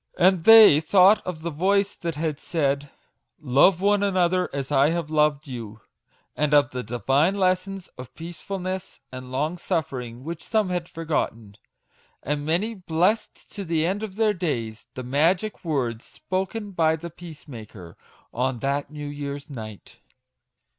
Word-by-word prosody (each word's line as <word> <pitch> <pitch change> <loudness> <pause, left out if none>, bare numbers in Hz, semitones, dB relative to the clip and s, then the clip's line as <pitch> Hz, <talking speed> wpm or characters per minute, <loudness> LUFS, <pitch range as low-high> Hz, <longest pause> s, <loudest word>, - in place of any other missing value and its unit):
And 185 -2 +3
they 220 -9 +9
thought 190 +5 +5
of 160 -3 -5
the 170 - -3
voice 195 +6 +1
that 170 -1 -4
had 155 -1 -2
said, 145 -3 -1 0.3
" - - -51
Love 155 +6 +4
one 205 0 +3
another 185 -2 +1
as 140 0 -4
I 140 +1 +4
have 165 -2 -2
loved 150 -1 +2
you," 115 -4 -8 0.5
and 150 0 +2
of 145 0 +4
the 125 - -4
divine 135 - +1
lessons 185 0 0
of 125 - -10
peacefulness 185 +3 -6
and 130 0 -9
long 155 +7 -2
suffering 130 -9 -3
which 165 +2 -6
some 215 -4 0
had 180 -1 -3
forgotten! 115 -10 -3 0.7
And 145 +1 -2
many 190 +8 0
blessed 185 +2 -1
to 200 - -6
the 165 -3 0
end 195 +4 -1
of 210 -3 -6
their 215 -1 +2
days 115 - -3
the 130 - -5
Magic 165 - 0
Words 125 -8 -2
spoken 195 +3 -4
by 160 -3 +2
the 170 +2 -8
Peacemaker* 120 - -11 0.4
on 125 +1 -1
that 140 +3 -2
New 150 0 -7
year's 145 0 -6
Night. 110 -6 -9
160 Hz, 155 wpm, -24 LUFS, 140-185 Hz, 0.7 s, they